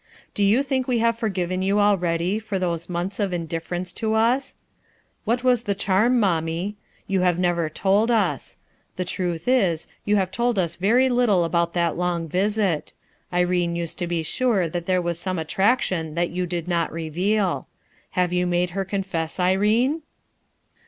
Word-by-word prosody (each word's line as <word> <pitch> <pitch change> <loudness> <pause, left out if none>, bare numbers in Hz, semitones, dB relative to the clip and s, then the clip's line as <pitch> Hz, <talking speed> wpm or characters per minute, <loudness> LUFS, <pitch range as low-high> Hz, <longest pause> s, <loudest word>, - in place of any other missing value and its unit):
Do - - -3
you 210 +7 +4
think 260 -2 -1
we 250 -2 +1
have 230 0 +1
forgiven 185 -4 -1
you 200 +2 +2
already 180 -1 +2
for 215 -3 -3
those 170 -2 -2
months 175 +4 -3
of 200 -3 0
indifference 170 +1 -4
to 220 +2 -1
us? 240 +5 +1 0.7
What 240 +3 0
was 250 -3 +3
the 205 -4 -2
charm, 210 +6 +2
mommie? 175 0 0 0.3
You 195 -2 0
have 180 -2 +2
never 175 -3 +1
told 200 +7 +2
us. 230 -2 0 0.4
The 180 - -2
truth 175 -1 -3
is, 190 -11 +2 0.2
you 210 - +2
have 190 -2 +1
told 240 +2 0
us 170 -3 0
very 230 +9 +3
little 240 -8 +3
about 170 0 0
that 170 -2 +1
long 175 -2 -1
visit. 195 -1 0 0.4
Irene 175 -1 +1
used 170 -1 -5
to 175 - -2
be 170 -1 -1
sure 215 -1 +1
that 170 +1 -5
there 185 -1 +2
was 170 -1 -2
some 185 +1 -2
attrac 195 +10 +2
tion 160 -4 -2
that 170 0 0
you 180 +1 -2
did 175 -1 -4
not 170 -2 0
reveal. 180 +5 -1 0.5
Have 180 -1 +2
you 180 0 +1
made 175 0 0
her 195 +2 -2
confess, 190 -4 -3
Irene?" 210 - +2
185 Hz, 170 wpm, -23 LUFS, 170-210 Hz, 0.7 s, you